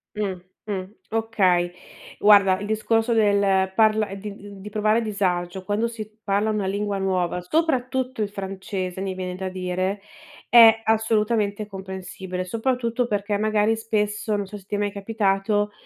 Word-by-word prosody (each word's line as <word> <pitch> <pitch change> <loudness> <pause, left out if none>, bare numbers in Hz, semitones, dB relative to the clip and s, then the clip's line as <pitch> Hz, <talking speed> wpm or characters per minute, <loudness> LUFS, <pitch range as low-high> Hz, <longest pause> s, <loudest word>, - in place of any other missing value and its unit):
Mh, 205 -3 -1 0.3
mh. 195 -3 -3 0.3
Okay. 190 -6 +2 0.5
Guarda, 200 -2 +6
il 205 - -5
discorso 225 +2 +1
del 200 -3 +3
parla 215 -1 +3
di 200 +1 -7
d 205 - -12
di 210 +2 -8
provare 215 +2 +2
disagio 190 -3 -1
quando 210 +4 0
si 215 -2 -8
parla 205 +2 +1
una 210 -2 -1
lingua 200 +1 -1
nuova, 185 -2 0
soprattutto 260 - 0
il 205 - 0
francese 190 -2 -5
mi 195 -1 -2
viene 185 -1 -4
da 190 +1 -4
dire, 185 +2 -2 0.5
è 225 -2 +8
assolutamente 215 -1 +1
comprensibile, 190 -1 -6
soprattutto 235 +3 -1
perché 205 -1 -1
magari 215 +1 +2
spesso, 215 -1 -1
non 205 -1 -2
so 210 - -8
se 195 - -16
ti - - -2
è - - 0
mai 205 0 -1
capitato, 205 0 0
205 Hz, 150 wpm, -24 LUFS, 190-220 Hz, 0.5 s, è